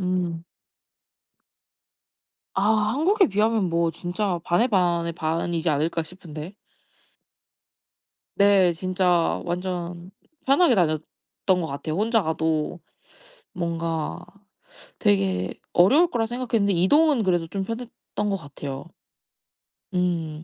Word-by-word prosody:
음. 180 -2 -2 2.1
아 195 - 0 0.3
한국에 380 +5 +3
비하면 215 0 +1
뭐 170 0 +1
진짜 175 +2 -2
반의 200 +8 +2
반의 175 -6 +1
반이지 165 +1 -1
않을까 160 +3 0
싶은데. 165 +1 -10 1.8
네. 200 -3 +5
진짜 180 0 +1
완전 175 0 -4 0.3
편하게 275 0 +4
다녔던 155 -5 +1 0.6
것 - - -2
같아요. 155 +3 -4
혼자 220 +2 +2
가도 160 0 -1 0.7
뭔가 165 -2 -3 0.8
되게 95 -2 +1 0.2
어려울 280 - +5
거라 230 -5 0
생각했는데 230 -4 0
이동은 275 - +4
그래도 175 -3 +1
좀 195 +3 -3
편했던 230 -1 -5
것 195 - 0
같아요. 140 -3 -7 1.1
음. 165 -4 -1
175 Hz, 210 characters per minute, -24 LUFS, 165-205 Hz, 2.1 s, 네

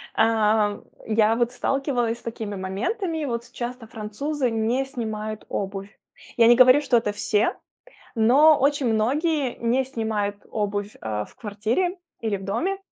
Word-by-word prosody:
А, 215 -2 +2 0.3
я 220 0 +3
вот 240 0 +1
сталкивалась 245 -3 -1
с - - -21
такими 220 -3 -5
моментами. 300 - -2
Вот 235 -1 -4
часто 240 -1 -6
французы 240 +6 -3
не 230 +4 0
снимают 215 -4 -5
обувь. 195 +1 -5 0.4
Я 230 -1 +6
не 240 - +7
говорю, 255 +3 +7
что 250 -4 +3
это 215 -2 0
все, 210 +1 0 0.6
но 280 +7 +6
очень 280 -1 +1
многие 275 +4 0
не 245 +3 +1
снимают 220 -5 -2
обувь, 205 -1 -3
э, 105 -1 -3
в - - -18
квартире 225 - -1 0.2
или 220 -3 -1
в 190 - -10
доме. 330 - -1
230 Hz, 145 wpm, -24 LUFS, 210-265 Hz, 0.6 s, не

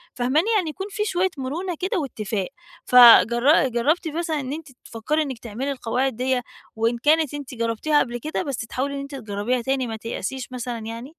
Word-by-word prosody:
فاهماني؟ 260 +9 +1
يعني 360 -6 +1
يكون 385 +6 -6
في 420 +1 -2
شوية 375 -1 +1
مرونة 330 +7 -3
كده 375 +1 -1
واتفاق، 215 - -3 0.4
فجر 245 +3 +7
جرّبتِ 290 +9 0
مثلًا 320 -1 -2
إن 265 +1 -4
أنتِ 320 0 -7 0.2
تفكري 265 +8 -1
إنك 265 -6 -4
تعملي 245 +5 -4
القواعد 255 0 -1
دِيّة، 255 +1 0 0.3
وإن 230 +2 0
كانت 300 +2 +2
أنتِ 280 -3 -7
جرّبتيها 230 +7 +1
قبل 240 -1 -1
كده 305 +6 -3
بس 275 -4 -4
تحاولي 265 +5 -3
إن - - -4
أنت 275 0 -7
تجرّبيها 225 +1 -2
تاني، 265 0 -1
ما 225 - -4
تيأسيش 230 +3 -5
مثلًا 245 -2 -4
يعني؟ 230 +3 -7
260 Hz, 180 wpm, -23 LUFS, 235-305 Hz, 0.4 s, فجر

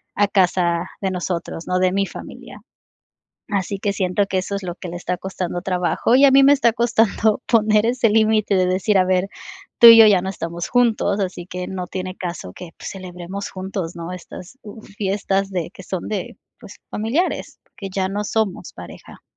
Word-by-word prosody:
a 205 0 +3
casa 180 -3 +1
de 195 - 0
nosotros, 175 -2 -4
¿no?, 180 0 0
de 185 0 +2
mi 195 +1 +1
familia, - - -11 0.9
así 200 0 -2
que 200 +1 -1
siento 190 0 0
que 190 -1 -1
eso 190 +2 -3
es 200 - -6
lo 175 -1 -5
que 180 - -8
le 175 - -6
está 180 0 -3
costando 180 -2 -4
trabajo 180 +4 0
y 275 - +6
a 280 - +7
mí 270 +1 +6
me 280 - +7
está 240 -5 +2
costando 225 -1 +1
poner 215 -2 +3
ese 240 -1 +2
límite 215 -1 +2
de 185 - +2
decir, 190 +3 +1
a 185 - +4
ver, 185 +1 +1 0.5
tú 235 - +10
y 230 0 +10
yo 225 - +9
ya 195 -4 +4
no 190 - -3
estamos 170 -1 -5
juntos, 230 -4 +1
así 180 -2 -4
que 180 0 -6
no 185 -1 -5
tiene 185 -1 -5
caso 170 - -6
que, 180 -2 -10
pues, - - -7
celebremos 185 +1 -7
juntos, 185 -2 -5
¿no?, 170 +1 -6
estas, 180 +5 -10
uh, 215 +1 -11
fiestas 195 -1 -2
de 175 -4 -3
que 190 - -13
son 185 -1 -5
de, 205 -4 -4 0.2
pues, - - -12
familiares, 250 - -2 0.2
que 195 - -6
ya 190 -1 0
no 205 +2 -3
somos 210 -5 -2
pareja. 85 -1 -12
190 Hz, 200 wpm, -20 LUFS, 180-215 Hz, 0.9 s, tú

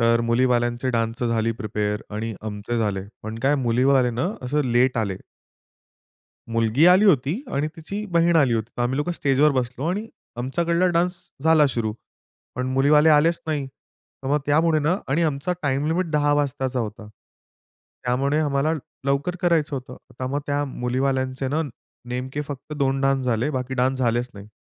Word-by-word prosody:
तर 115 0 +4
मुलीवाल्यांचे 120 +1 +1
डान्स 115 0 -1
झाली 115 -1 +1
प्रिपेअर 105 0 -2
आणि 110 +1 -3
आमचे 105 +3 -4
झाले. 105 -3 0 0.2
पण 110 +1 -6
काय 140 +2 +3
मुलीवाले 125 +2 +3
ना 125 +11 -1
असं 145 +4 0
लेट 125 +1 +3
आले. 100 -4 -1 1.4
मुलगी 115 +6 +3
आली 185 +4 +6
होती 160 - +3
आणि 145 +2 0
तिची 200 +6 -5
बहीण 170 0 +3
आली 135 -6 +4
होती. 110 0 -2
तर 120 - 0
आम्ही 125 +2 0
लोकं 150 +5 -1
स्टेजवर 145 -2 +3
बसलो 130 +3 -2
आणि 205 +4 -3 0.3
आमच्याकडला 170 +8 +1
डान्स 180 +2 +2 0.3
झाला 160 -2 +5
सुरू. 115 -5 -1 0.6
पण 125 +1 -2
मुलीवाले 150 +4 +5
आलेच 160 +2 +4
नाही. 150 -3 -1
तर 135 0 -17
मग 145 +2 +3
त्यामुळे 155 +2 +3
ना 160 +5 +2
आणि 145 +6 +1
आमचा 155 +2 0
टाईम 140 0 0
लिमिट 170 +2 0
10 145 -1 +2
वाजताचा 130 -3 -1
होता. 110 -1 -6 1.0
त्यामुळे 135 +4 +1
आम्हाला 145 0 +1 0.3
लवकर 140 +6 0
करायचं 165 -4 +2
होतं. 125 -1 -8 0.2
तर 130 - -1
मग 140 +3 -1
त्या 145 0 0
मुलीवाल्यांचे 130 0 -1
ना 155 +4 0 0.5
नेमके 130 +3 -3
फक्त 145 +1 -7
2 135 -1 +1
डान्स 135 -1 +1
झाले, 120 +4 +1
बाकी 130 -2 -3
डान्स 130 +1 +1
झालेच 120 0 0
नाही. 100 0 -10
135 Hz, 165 wpm, -23 LUFS, 120-150 Hz, 1.4 s, आली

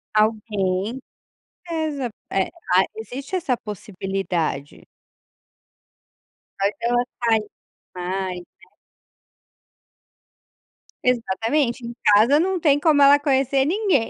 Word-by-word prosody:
Alguém. 215 0 0 0.7
Exa 305 -6 -2 0.2
é 190 -1 0 0.3
ah, 190 - +6
existe 255 - -7
essa 320 -9 0
possibilidade. 190 -8 -4 1.7
Faz 200 +1 +2
ela 240 +1 +2 0.2
sair 220 -2 +2 0.5
mais, 185 0 -3
né. 175 - -20 2.3
Exatamente, 240 +2 0
em 235 - -6
casa 220 +8 +6
não 375 +3 +1
tem 290 -3 +3
como 295 -1 +4
ela 280 +1 +7
conhecer 270 -1 +2
ninguém. 365 - +1
235 Hz, 90 wpm, -22 LUFS, 195-280 Hz, 2.3 s, ela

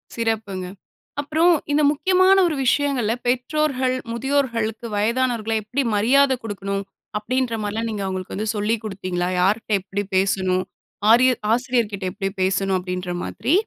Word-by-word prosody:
சிறப்புங்க. 220 -5 -2 0.6
அப்புறம் 320 +4 +3 0.2
இந்த 295 +1 +3
முக்கியமான 370 +5 +4
ஒரு 315 - -1
விஷயங்கள்ல 255 -4 +2
பெற்றோர்கள், 255 0 0 0.2
முதியோர்களுக்கு 235 -3 -1
வயதானவர்கள 230 +1 0
எப்டி 255 +7 -1
மரியாத 265 +6 +4
குடுக்கனும் 200 -2 -3 0.3
அப்டின்ற 245 +2 -1
மாரிலாம் 220 +2 -2
நீங்க 210 -2 -3
அவங்களுக்கு 185 -1 -4
வந்து 215 +2 -3
சொல்லி 210 +2 +1
குடுத்தீங்களா? 185 -3 -3
யார்ட்ட 205 +6 +1
எப்டி 200 +2 -3
பேசனும். 185 -1 +1 0.5
ஆரியர் 255 +1 +5
ஆசிரியர்கிட்ட 235 -5 0
எப்டி 195 0 -3
பேசனும் 190 0 +1
அப்டின்ற 180 0 -4
மாதிரி? 240 - -1
225 Hz, 125 wpm, -22 LUFS, 195-260 Hz, 0.6 s, ஆரியர்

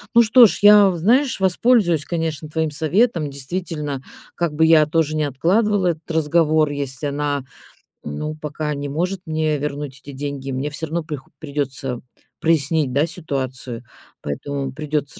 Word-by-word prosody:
Ну 235 - +8
что 230 +1 +7
ж, - - -4
я, 205 -2 +8
знаешь, 245 - +2
воспользуюсь, 190 - +3
конечно, 160 -3 -3
твоим 160 -1 -1
советом. 160 +2 +1
Действительно, 145 0 -4 0.3
как 170 -3 -1
бы 160 - +4
я 160 -2 +6
тоже 155 -1 0
не 155 - +1
откладывала 185 - +1
этот 165 -1 -3
разговор, 155 -1 +2
если 140 -1 -3
она, 145 -1 -2 0.6
ну, 150 - -4
пока 150 0 -4
не 145 0 -4
может 180 +6 -2
мне 155 -1 0
вернуть 145 -1 -5
эти 140 - -9
деньги, 135 0 -5
мне 135 +3 -2
всё 160 +2 -4
равно 165 +2 -2
прихо 150 -4 -7
придётся 135 -4 -4 0.4
прояснить, 155 -3 +1
да, 145 +3 +3
ситуацию, 130 -7 -5 0.4
поэтому 135 - -4
придётся 150 +3 -3
155 Hz, 150 wpm, -21 LUFS, 140-170 Hz, 0.6 s, Ну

